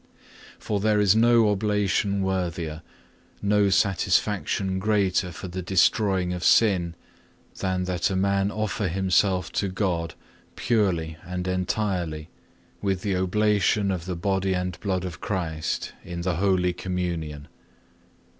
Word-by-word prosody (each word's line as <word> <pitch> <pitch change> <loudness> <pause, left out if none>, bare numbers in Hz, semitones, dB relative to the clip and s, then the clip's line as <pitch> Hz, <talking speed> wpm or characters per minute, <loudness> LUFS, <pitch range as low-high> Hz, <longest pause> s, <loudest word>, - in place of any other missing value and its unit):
For 105 - -2
there 105 +1 +2
is 100 -1 +4
no 115 0 +5
oblation 100 -1 0
worthier, 85 -4 -2 0.6
no 100 0 +2
satisfaction 95 0 +1
greater 95 -3 +1
for 85 - -8
the 90 +1 -5
destroying 95 0 +2
of 90 -1 -5
sin, 90 -7 +3 0.6
than 95 -1 -1
that 90 -1 0
a 95 - -2
man 100 +1 +1
offer 105 -1 -2
himself 95 0 +1
to 100 - -1
God 90 -4 -2 0.4
purely 85 -9 0
and 90 0 -4
entirely 90 -4 -2 0.5
with 95 -2 -1
the 100 -2 0
oblation 100 +1 +2
of 90 -3 -3
the 90 -1 -3
Body 95 +1 0
and 90 -2 -3
Blood 95 -3 -2
of 90 -3 -7
Christ 80 -6 -3
in 85 -2 -6
the 90 -1 -1
Holy 90 -2 +2
Communion. 85 -6 -4
95 Hz, 125 wpm, -25 LUFS, 90-100 Hz, 0.6 s, no